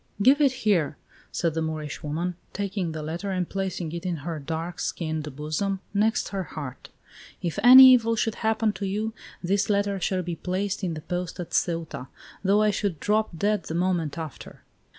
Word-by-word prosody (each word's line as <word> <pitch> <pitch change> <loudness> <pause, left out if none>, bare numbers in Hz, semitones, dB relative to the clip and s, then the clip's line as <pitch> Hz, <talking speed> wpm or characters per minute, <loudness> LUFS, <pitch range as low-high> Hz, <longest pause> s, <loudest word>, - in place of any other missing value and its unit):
"Give 265 +8 +5
it 280 -3 +5
here!" 170 -8 +2 0.3
said 170 -2 0
the 160 - -1
Moorish 155 -2 -4
woman, 165 +4 -2 0.2
taking 195 -3 -2
the 155 -1 -5
letter 170 +6 -4
and 185 -2 -1
placing 190 -4 -3
it 170 0 -5
in 180 -2 -1
her 165 -3 -3
dark 165 +4 -4
skinned 155 -4 -3
bosom, 155 +7 -2
next 220 +3 +1
her 195 -1 -2
heart. 140 -6 -7 0.5
"If 170 -3 -2
any 260 +2 +11
evil 230 -2 +4
should 225 0 0
happen 220 -1 +1
to 195 0 -4
you, 215 +3 -2 0.3
this 195 +4 +1
letter 200 -1 +1
shall 185 0 0
be 175 -1 -3
placed 190 +2 -2
in 170 -3 -1
the 155 - -6
post 180 +1 -4
at 175 - -5
Ceuta, 165 -6 -1 0.4
though 205 +2 +4
I 210 - +4
should 195 -5 -2
drop 215 -4 0
dead 205 +3 +1
the 160 - -4
moment 175 -4 0
after." 160 -5 -8
180 Hz, 185 wpm, -26 LUFS, 160-205 Hz, 0.5 s, any